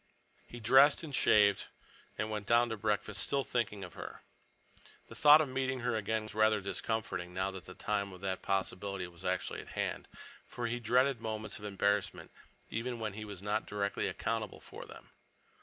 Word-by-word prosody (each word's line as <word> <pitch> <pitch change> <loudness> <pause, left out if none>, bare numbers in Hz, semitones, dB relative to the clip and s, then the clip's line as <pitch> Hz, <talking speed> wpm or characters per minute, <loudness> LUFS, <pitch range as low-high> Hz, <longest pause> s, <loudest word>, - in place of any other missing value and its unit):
He 120 - -9
dressed 135 +7 +6
and 150 -3 -7
shaved 100 -5 +4 0.5
and 110 0 -2
went 105 -2 -4
down 120 +1 +4
to 110 - -2
breakfast, 105 0 -1
still 140 -1 0
thinking 105 -6 -2
of 90 - -9
her. - - -8 0.9
The - - -9
thought 150 +1 +8
of 155 - 0
meeting 130 -1 -1
her 120 -1 0
again 110 +1 -1
was 110 - -9
rather 110 0 +4
discomforting, 95 -2 -3
now 95 +1 0
that 95 -1 -9
the - - -10
time 100 -2 -1
of 90 - -11
that 95 -1 -2
possibility 95 0 -2
was 85 0 -14
actually 90 0 -1
at - - -15
hand, - - -2 0.4
for 120 - -5
he 120 +1 -1
dreaded 125 +2 +2
moments 110 -1 -4
of 105 - -9
embarrassment 100 0 0 0.4
even 120 +1 -3
when 110 -2 -3
he 110 +1 -6
was 100 -2 -8
not 105 +1 -1
directly 100 -1 -1
accountable - - -3
for - - -10
them. - - -13
105 Hz, 185 wpm, -33 LUFS, 100-120 Hz, 0.9 s, thought